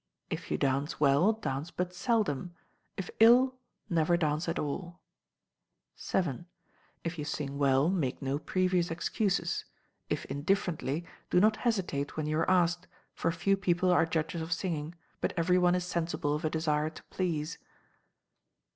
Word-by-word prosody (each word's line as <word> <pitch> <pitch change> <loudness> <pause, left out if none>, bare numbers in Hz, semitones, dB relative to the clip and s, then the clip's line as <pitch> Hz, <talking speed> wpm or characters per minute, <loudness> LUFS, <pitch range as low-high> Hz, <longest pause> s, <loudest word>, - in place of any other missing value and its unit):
If - - -4
you - - 0
dance 140 +3 0
well, 145 +7 +5
dance 150 -8 -3
but 180 0 -3
seldom; 180 - 0 0.4
if 190 - -4
ill, 245 +4 +7 0.3
never 170 -2 +2
dance 155 0 0
at 165 - -1
all. 175 +4 -4 1.0
vii. 165 -9 -1 0.6
If 165 0 -4
you - - -2
sing 145 -1 -4
well, 135 +1 +4
make 165 -9 0
no 135 +1 -1
previous 185 +1 +1
excuses: 175 +1 0 0.5
if - - -2
indifferently, 160 0 -1 0.2
do 180 - +4
not 215 +3 +4
hesitate 180 - -1
when 155 - -1
you 155 +1 0
are 165 - +1
asked, 175 -1 +2 0.3
for 165 - 0
few 195 +4 +2
people 180 -1 +1
are 165 -2 +4
judges 165 +1 -1
of 160 +2 -5
singing, 165 -2 -3 0.2
but - - -1
every 180 +2 +3
one 180 0 +4
is 180 -1 -1
sensible 170 -4 -1
of 150 - -2
a 155 - +1
desire 155 -1 0
to 160 - -13
please. 165 -4 -2
170 Hz, 155 wpm, -30 LUFS, 150-180 Hz, 1.0 s, ill